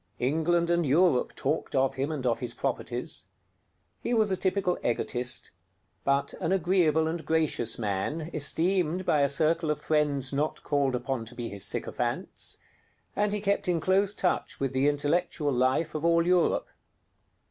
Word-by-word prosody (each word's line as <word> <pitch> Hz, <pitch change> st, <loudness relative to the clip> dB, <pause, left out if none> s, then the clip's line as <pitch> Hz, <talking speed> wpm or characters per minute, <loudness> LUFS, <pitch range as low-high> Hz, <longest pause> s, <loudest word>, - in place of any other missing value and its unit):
England 165 Hz, +6 st, +1 dB
and 170 Hz, 0 st, +2 dB
Europe 155 Hz, -1 st, +3 dB
talked -, -, -2 dB
of 135 Hz, 0 st, +2 dB
him 135 Hz, +3 st, -2 dB
and 140 Hz, -5 st, -4 dB
of 120 Hz, -2 st, +1 dB
his 120 Hz, -2 st, -5 dB
properties. -, -, -3 dB, 0.7 s
He 240 Hz, -, -1 dB
was 215 Hz, -3 st, +2 dB
a -, -, +2 dB
typical 185 Hz, -1 st, 0 dB
egotist: 120 Hz, +1 st, -2 dB, 0.5 s
but 140 Hz, 0 st, +1 dB
an 165 Hz, -, 0 dB
agreeable 175 Hz, -4 st, +3 dB
and 165 Hz, 0 st, -3 dB
gracious 155 Hz, -8 st, +1 dB
man, 120 Hz, -, -2 dB
esteemed 175 Hz, +3 st, +1 dB
by 150 Hz, -, +3 dB
a 140 Hz, -, +3 dB
circle 160 Hz, +3 st, +1 dB
of 150 Hz, -1 st, 0 dB
friends 145 Hz, -3 st, 0 dB
not 150 Hz, +3 st, -1 dB
called 140 Hz, -3 st, +1 dB
upon 125 Hz, -1 st, -3 dB
to 120 Hz, +2 st, -10 dB
be 120 Hz, -1 st, -4 dB
his 100 Hz, -1 st, -5 dB
sycophants; -, -, -2 dB, 0.6 s
and 205 Hz, 0 st, +1 dB
he 210 Hz, -, 0 dB
kept 200 Hz, -1 st, 0 dB
in 175 Hz, -2 st, +2 dB
close 195 Hz, +3 st, +2 dB
touch 180 Hz, -, -1 dB
with 135 Hz, -1 st, -1 dB
the 130 Hz, +2 st, +2 dB
intellectual 145 Hz, 0 st, 0 dB
life 130 Hz, +6 st, +1 dB
of 155 Hz, -, -4 dB
all 170 Hz, 0 st, +3 dB
Europe. 180 Hz, -1 st, +2 dB
155 Hz, 160 wpm, -28 LUFS, 135-175 Hz, 0.7 s, Europe